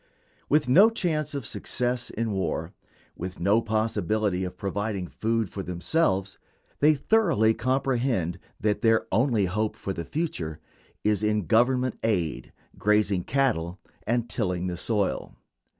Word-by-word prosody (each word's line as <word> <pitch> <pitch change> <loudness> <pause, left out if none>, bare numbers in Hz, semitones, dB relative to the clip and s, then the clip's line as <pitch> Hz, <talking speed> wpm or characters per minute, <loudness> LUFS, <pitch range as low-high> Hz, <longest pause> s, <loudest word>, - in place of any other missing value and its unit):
With 150 -1 +3
no 190 - +7
chance 155 -9 -1
of 140 -5 -4
success 125 0 -2
in 115 0 -2
war, 95 -2 -2 0.4
with 90 +1 -6
no 100 +6 +3
possibility 110 -3 0
of 90 - -5
providing 100 -1 -2
food 115 +3 -1
for 95 - -6
themselves, 95 - 0 0.4
they 150 +1 +5
thoroughly 160 - +3
comprehend 125 -8 0 0.2
that 105 0 0
their 115 0 +3
only 115 -1 +2
hope 105 +4 -1
for 95 - -4
the 85 - -4
future 85 - -3 0.4
is 105 -2 +2
in 105 -2 +1
Government 125 +7 +2
aid, 90 -9 -1 0.3
grazing 105 -3 +2
cattle, 110 -10 0 0.3
and 120 +1 +1
tilling 90 -6 -1
the 90 -1 -2
soil. 100 +2 -1
110 Hz, 135 wpm, -26 LUFS, 95-125 Hz, 0.4 s, no